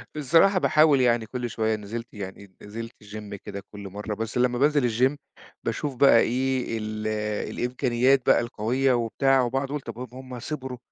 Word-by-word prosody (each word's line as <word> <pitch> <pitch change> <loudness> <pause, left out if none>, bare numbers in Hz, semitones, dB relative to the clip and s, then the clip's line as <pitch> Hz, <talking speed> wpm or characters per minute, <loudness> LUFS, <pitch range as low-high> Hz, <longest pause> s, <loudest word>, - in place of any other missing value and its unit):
الصراحة 165 +7 +4
باحاول 150 -5 +4
يعني 120 -2 +2
كُل 120 +1 -4
شوية 110 0 0
نزلت 115 +3 -6
يعني 100 -1 -9
نزلت 115 +3 -7
الgym 105 0 -8
كده 100 0 -8
كُل 100 -2 -8
مرّة، 105 +2 -5
بس 115 +2 -4
لمّا 125 0 +2
بانزل 145 -2 +3
الgym 130 +5 +2 0.5
باشوف 145 -3 -2
بقى 125 -3 +6
إيه، 130 -1 0
ال 110 0 -4 0.5
الإمكانيات 125 +1 +2
بقى - - +6
القوية 120 +3 0
وبتاع 130 +3 +2
وباقعد 135 +3 -1
أقول 145 -1 -3
طب 115 - -7
ب 125 0 -9
هُم 130 -2 -8
صِبروا 130 -2 -5
120 Hz, 165 wpm, -25 LUFS, 110-135 Hz, 0.5 s, بقى